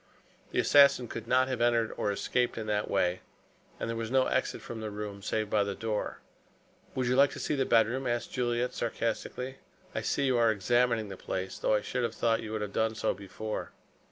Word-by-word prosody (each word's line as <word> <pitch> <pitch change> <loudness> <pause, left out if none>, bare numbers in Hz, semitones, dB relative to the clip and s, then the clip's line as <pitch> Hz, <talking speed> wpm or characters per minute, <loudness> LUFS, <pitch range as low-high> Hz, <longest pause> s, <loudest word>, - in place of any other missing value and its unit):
The - - -5
assassin 140 -3 +6
could 115 0 -7
not 130 +1 +4
have 130 -2 -2
entered 120 -2 +2
or 105 - 0
escaped 120 +5 0
in 110 - -3
that 105 -1 -1
way, 90 -2 +1 0.6
and - - -2
there 115 - -2
was 115 -1 -3
no 130 +1 +3
exit 130 - 0
from 115 -2 -7
the 110 - -3
room 105 -1 -6
save 110 +1 -1
by 105 -1 +3
the 100 -1 -3
door. 110 -2 -3 0.7
"Would 130 - 0
you 125 +1 +2
like 140 +1 +6
to - - -7
see - - -1
the 135 -2 +1
bedroom?" 120 +3 +3
asked 120 0 -2
Juliet 120 0 0
sarcastically. 120 +3 -3 0.4
"I - - -2
see 140 - 0
you 130 -3 +2
are 115 -1 +5
examining 115 +1 +1
the 95 - -7
place, 95 +1 -4
though - - +2
I 105 - +1
should 125 - -2
have 120 - -1
thought 115 -1 +1
you 110 - -6
would 110 -1 -2
have 105 -1 -4
done 110 0 +1
so - - 0
before." 105 +2 -6
115 Hz, 215 wpm, -30 LUFS, 105-125 Hz, 0.7 s, assassin